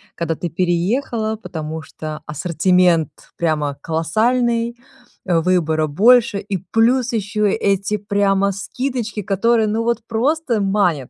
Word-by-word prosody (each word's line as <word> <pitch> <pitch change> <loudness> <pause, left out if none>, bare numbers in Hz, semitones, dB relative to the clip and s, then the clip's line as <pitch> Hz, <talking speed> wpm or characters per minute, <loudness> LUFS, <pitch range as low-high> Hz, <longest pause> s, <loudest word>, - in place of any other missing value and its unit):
когда 165 -1 -2
ты 175 - -4
переехала, 215 - -1
потому 160 -6 -6
что 155 +1 -7
ассортимент 170 +1 +2 0.3
прямо 150 -4 -1
колоссальный, 230 +8 0 0.5
а 170 -2 +2
выбора 160 -3 +1
больше 210 +5 +4
и 200 -1 -3
плюс 235 +5 +1
ещё 210 0 -1
эти 200 +1 +1
прямо 200 -1 +1
скидочки, 225 +2 -4
которые 220 +3 +1
ну 225 +2 -1
вот 235 0 0
просто 245 +1 0
манят. 195 -9 +1
200 Hz, 120 wpm, -19 LUFS, 170-230 Hz, 0.5 s, больше